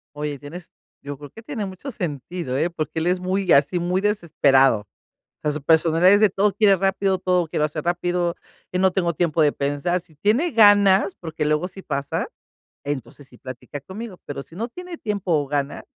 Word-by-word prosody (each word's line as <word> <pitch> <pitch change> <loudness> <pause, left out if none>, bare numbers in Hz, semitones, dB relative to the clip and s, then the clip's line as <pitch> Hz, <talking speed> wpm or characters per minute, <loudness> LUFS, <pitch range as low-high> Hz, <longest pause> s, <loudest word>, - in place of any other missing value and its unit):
Oye, 150 -1 -4
tienes 160 +5 -10 0.3
yo 145 0 -6
creo 145 0 -11
que 225 - -13
tiene 230 -3 -4
mucho 190 +8 -7
sentido, 165 - -4
eh, 165 +4 +1
porque 160 -1 -4
él 160 - -1
es, 180 +1 +1
muy 185 0 0
así, 145 +5 +4
muy 180 +2 0
desesperado. 145 - +3
O 105 - -17 0.6
sea, 150 - +1
su 150 0 -3
personalidad 165 +4 +4
es 205 - +5
de, 215 -2 +5
todo 195 +1 +1
quiere 205 -1 +4
rápido, 195 0 +1
todo 180 -2 +1
quiero 150 - 0
hacer 155 0 -6
rápido, 175 0 0 0.4
y 180 - -2
no 190 0 +3
tengo 175 -2 0
tiempo 165 0 +1
de 145 -1 +4
pensar, 145 +6 -1
si 170 -2 -23
tiene 230 - +1
ganas, 205 -3 +5
porque 160 -3 -4
luego 150 +4 0
si 190 +1 -11
pasa, 140 -3 -3 0.6
entonces 140 -1 -6
sí 125 - -18
platica 130 +4 -8
conmigo, 190 +6 -9
pero 140 -1 -5
si 165 - -15
no 230 +3 -2
tiene 360 +6 -9
tiempo 205 - -3
o 145 - -4
ganas, 140 0 -2
175 Hz, 200 wpm, -22 LUFS, 145-195 Hz, 0.6 s, es